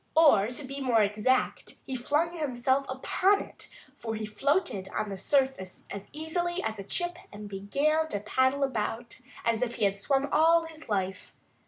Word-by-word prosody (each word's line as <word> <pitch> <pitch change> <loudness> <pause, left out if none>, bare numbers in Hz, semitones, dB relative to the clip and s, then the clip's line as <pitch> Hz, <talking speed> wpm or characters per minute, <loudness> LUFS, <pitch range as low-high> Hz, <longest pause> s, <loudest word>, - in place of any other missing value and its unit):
Or 290 -11 +6
to 250 +4 -5
be 275 +1 -6
more 235 -5 +4
exact, 215 +5 0
he 265 - -4
flung 300 +7 0
himself 265 -2 0
upon 370 +9 +2
it; - - -9 0.3
for 225 -1 -3
he 215 0 -3
floated 215 - 0
on 215 - -1
the 195 - -4
surface 260 -4 0
as 200 0 -7
easily 345 +3 -2
as 220 -1 -3
a - - -5
chip 350 - -2
and 210 0 -8
began 280 +11 0
to 205 - -2
paddle 260 +6 +2
about 235 -2 -3 0.3
as 230 0 +1
if 245 -1 -1
he - - +1
had 200 0 0
swum 275 +5 +1
all 330 +2 +5
his 315 -4 -11
life. 190 -2 -2
260 Hz, 175 wpm, -29 LUFS, 210-305 Hz, 0.3 s, Or